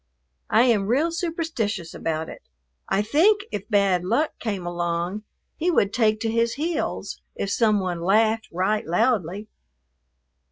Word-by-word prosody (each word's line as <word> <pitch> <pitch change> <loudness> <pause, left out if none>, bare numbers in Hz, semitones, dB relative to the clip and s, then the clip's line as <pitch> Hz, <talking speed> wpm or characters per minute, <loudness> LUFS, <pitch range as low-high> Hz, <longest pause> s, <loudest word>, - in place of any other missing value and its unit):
I 225 - +5
am 220 -6 +2
real 285 +9 +2
superstitious 320 - -3
about 160 0 -3
it. - - -10 0.5
I 200 - +2
think 355 - +3
if 200 +2 -5
Bad 200 -4 +2
Luck 295 +12 +1
came 200 -6 -3
along, 175 +3 -2 0.4
he 345 - 0
would 205 - +2
take 215 -3 +2
to 225 -2 0
his 230 0 +1
heels 320 +4 -3
if 200 - -3
some 215 -2 +3
one 180 -3 -3
laughed 220 +4 +2
right 190 +5 0
loudly. 205 0 0
215 Hz, 145 wpm, -24 LUFS, 185-245 Hz, 0.5 s, I